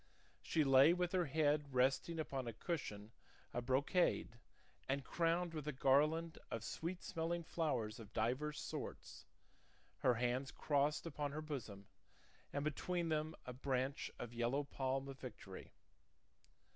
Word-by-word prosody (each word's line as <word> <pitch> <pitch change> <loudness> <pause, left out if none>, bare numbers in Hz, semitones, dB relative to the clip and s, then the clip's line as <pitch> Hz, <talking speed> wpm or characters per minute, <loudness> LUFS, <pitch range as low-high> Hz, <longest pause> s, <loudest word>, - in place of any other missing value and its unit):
She 155 - +2
lay 135 +3 +7
with 180 0 0
her 180 -2 +2
head 145 -1 +2
resting 135 +6 +3
upon 135 -5 -2
a 115 - -3
cushion 110 - -4 0.4
of 120 0 -3
brocade 140 +7 +2 0.5
and 140 +1 +1
crowned 170 0 +1
with 155 -2 -4
a - - +1
garland 150 +5 +3
of 115 - -3
sweet 170 +10 -4
smelling 170 0 -1
flowers 125 -11 -1
of 110 -2 -10
divers 130 +8 0
sorts, - - -6 0.7
her 125 -2 +4
hands 125 +3 0
crossed 145 +1 +1
upon 145 -3 -3
her 155 - -3
bosom, 120 -10 -5 0.7
and 140 - -1
between 170 +3 -1
them 155 0 0
a 125 - -5
branch 130 +1 -1
of 120 -1 -6
yellow 120 +4 +1
palm 135 -1 -1
of 135 -1 -8
victory. 105 -6 -8
140 Hz, 140 wpm, -40 LUFS, 125-160 Hz, 0.7 s, lay